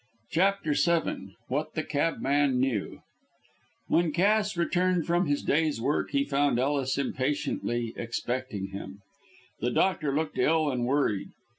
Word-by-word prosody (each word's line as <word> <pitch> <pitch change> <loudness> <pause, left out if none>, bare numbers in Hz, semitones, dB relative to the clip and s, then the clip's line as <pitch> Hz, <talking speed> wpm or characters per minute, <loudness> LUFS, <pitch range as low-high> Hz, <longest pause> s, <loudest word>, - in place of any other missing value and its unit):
CHAPTER 180 -2 +2
VII 145 - 0
WHAT 150 +4 -2
THE 155 - -1
CABMAN 145 -3 +1
KNEW 125 -6 -1 0.8
When 170 -1 +2
Cass 205 +3 +2
returned 180 0 +1
from 175 +1 +1
his 145 0 0
day's 155 -3 +1
work 140 +6 0
he 140 - +1
found 140 -2 +1
Ellis 135 0 0
impatiently 130 -4 -1
expecting 120 -3 -3
him. 100 0 -8 0.6
The 120 - 0
doctor 155 +1 +1
looked 150 +2 -2
ill 155 -2 +3
and 120 -2 -1
worried. 130 -8 0
145 Hz, 130 wpm, -28 LUFS, 125-165 Hz, 0.8 s, ill